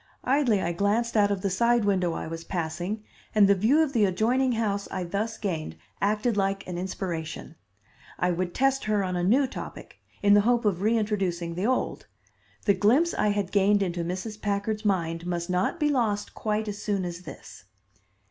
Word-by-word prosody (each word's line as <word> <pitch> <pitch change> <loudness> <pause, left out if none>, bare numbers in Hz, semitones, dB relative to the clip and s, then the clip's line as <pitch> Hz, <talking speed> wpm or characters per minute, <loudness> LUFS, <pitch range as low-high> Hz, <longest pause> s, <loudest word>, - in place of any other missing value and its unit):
Idly 250 -7 +2
I 170 - 0
glanced 205 +7 0
out 205 -2 +4
of 200 -2 -1
the 200 - +1
side 235 +3 +2
window 185 -4 +1
I - - -4
was 165 +1 -6
passing, 175 +5 -3 0.3
and 205 -2 +6
the 200 - +6
view 235 +11 +3
of 290 -3 -3
the 220 -4 +4
adjoining 240 +7 +1
house 205 -3 -1
I 185 - -3
thus 205 +5 -3
gained 160 - -3 0.3
acted 215 +3 +1
like 195 -1 0
an 180 - -5
inspiration. 170 -4 -5 0.6
I 180 - +1
would 175 0 -2
test 270 0 +1
her 210 -2 +1
on 185 -1 -2
a 175 - -1
new 250 +10 +4
topic, 255 - -8 0.2
in 205 0 +6
the 205 - +7
hope 235 +2 +2
of 190 -4 +1
reintroducing 200 -6 0
the 185 +6 -1
old. 255 - -1 0.6
The 200 - +5
glimpse 265 - +3
I - - +1
had 205 -2 0
gained 200 0 +3
into 175 -2 -2
Mrs. 185 +5 -5
Packard's 205 +2 -1
mind 170 -4 -1
must 175 0 -2
not 185 - 0
be 300 -1 +2
lost 220 -7 0
quite 215 0 -2
as 205 0 -5
soon 200 -3 -1
as 175 0 -5
this. 160 - -11
200 Hz, 190 wpm, -26 LUFS, 180-220 Hz, 0.6 s, the